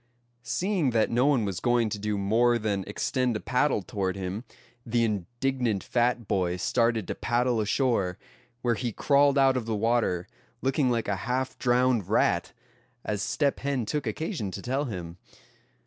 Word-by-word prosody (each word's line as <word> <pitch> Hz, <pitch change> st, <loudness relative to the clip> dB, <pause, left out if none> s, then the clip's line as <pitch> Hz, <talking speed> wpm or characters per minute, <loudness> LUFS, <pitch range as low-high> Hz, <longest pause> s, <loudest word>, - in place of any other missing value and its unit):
Seeing 170 Hz, -, 0 dB
that 110 Hz, -, +2 dB
no 125 Hz, +4 st, +3 dB
one 130 Hz, -7 st, +3 dB
was 95 Hz, -3 st, -3 dB
going 120 Hz, -2 st, +2 dB
to 105 Hz, -, -4 dB
do 105 Hz, 0 st, -1 dB
more 115 Hz, +5 st, +3 dB
than 105 Hz, -3 st, -1 dB
extend 125 Hz, +3 st, -1 dB
a -, -, -1 dB
paddle 125 Hz, -3 st, +1 dB
toward 95 Hz, 0 st, -2 dB
him, 95 Hz, +5 st, -4 dB, 0.4 s
the 120 Hz, 0 st, +1 dB
indignant 115 Hz, +2 st, -1 dB
fat 120 Hz, -2 st, 0 dB
boy 90 Hz, -2 st, 0 dB
started 115 Hz, +1 st, +1 dB
to -, -, -2 dB
paddle 120 Hz, -1 st, 0 dB
ashore; 105 Hz, -5 st, +1 dB, 0.5 s
where 120 Hz, -1 st, +2 dB
he 120 Hz, +1 st, -2 dB
crawled 140 Hz, +4 st, +3 dB
out 135 Hz, -1 st, +5 dB
of 120 Hz, -3 st, -2 dB
the 110 Hz, -, 0 dB
water, 110 Hz, -5 st, +1 dB, 0.4 s
looking 135 Hz, 0 st, +2 dB
like 115 Hz, -2 st, 0 dB
a 100 Hz, -1 st, 0 dB
half 130 Hz, +1 st, -1 dB
drowned 125 Hz, -4 st, +2 dB
rat, -, -, +2 dB, 0.5 s
as 105 Hz, -2 st, -2 dB
Step 140 Hz, +6 st, 0 dB
Hen 135 Hz, -4 st, -1 dB
took 145 Hz, +4 st, -2 dB
occasion 155 Hz, -, -3 dB
to 100 Hz, -, -6 dB
tell 135 Hz, +4 st, -1 dB
him. 90 Hz, -7 st, -6 dB
120 Hz, 165 wpm, -27 LUFS, 105-130 Hz, 0.5 s, out